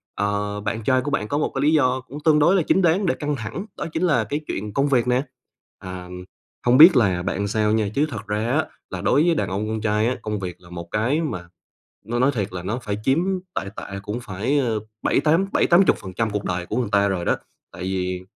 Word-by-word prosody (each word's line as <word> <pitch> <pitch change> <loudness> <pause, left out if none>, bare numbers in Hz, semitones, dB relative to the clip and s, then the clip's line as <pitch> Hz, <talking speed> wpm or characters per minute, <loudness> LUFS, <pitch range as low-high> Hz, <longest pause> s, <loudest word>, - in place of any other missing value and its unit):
ờ, 105 0 -1
bạn 110 +2 -3
trai 130 +2 +3
của 145 +3 -4
bạn 105 -7 -1
có 145 - -1
một 150 - 0
cái 135 - 0
lý 150 +2 +3
do 130 -4 +2
cũng 145 - -8
tương 155 -2 +5
đối 170 +6 +4
là 190 - +4
chính 190 - +4
đáng 180 +3 +3
để 170 - +1
căng 150 -1 -2
thẳng, 135 - -5
đó - - -3
chính 165 - -1
là 150 -10 +3
cái 140 +8 -3
chuyện 105 +1 -4
công 140 +4 +2
việc 125 -4 +2
nè. 125 +2 +2 0.6
À, 90 -1 -8 0.6
hông 125 +1 +5
biết 165 +3 +10
là 100 -7 +3
làm 90 - -5
bạn 100 +2 -1
sao 105 +1 +1
nha, 110 -1 +1
chứ 145 - +3
thật 110 -6 -7
ra 105 +2 -1
á, 155 +4 +2 0.2
là - - -5
đối 145 - +3
với 170 -1 +3
đàn - - -1
ông 100 +3 -2
con 110 0 -3
trai 105 0 +1
á, 125 - 0
công 105 -1 -3
việc 90 -3 -5
là 85 - -16
một 85 -1 -7
cái 120 +9 +1
mà 90 - -4 0.6
nói 120 +3 -2
nói 135 +3 +3
thiệt 100 -4 -2
là 90 -1 -5
nó 105 +7 -2
phải 105 -2 -3
chiếm 135 +5 +3 0.4
tệ - - -1
tệ 100 0 -6
cũng 105 +3 -4
phải, 110 +8 -1
ờ, 115 -6 0 0.2
bảy, - - +2
tám 165 +5 +2
bảy, - - +3
tám 175 +3 +6
chục - - +3
phần 95 - -9
trăm 110 +2 0
cuộc 105 0 -3
đời 90 0 -2
của - - -3
người 125 -3 0
ta 100 0 +4
rồi 95 -3 -2
đó, - - +2 0.4
tại 90 - -8
vì 90 -1 -2
110 Hz, 265 wpm, -23 LUFS, 100-145 Hz, 0.6 s, biết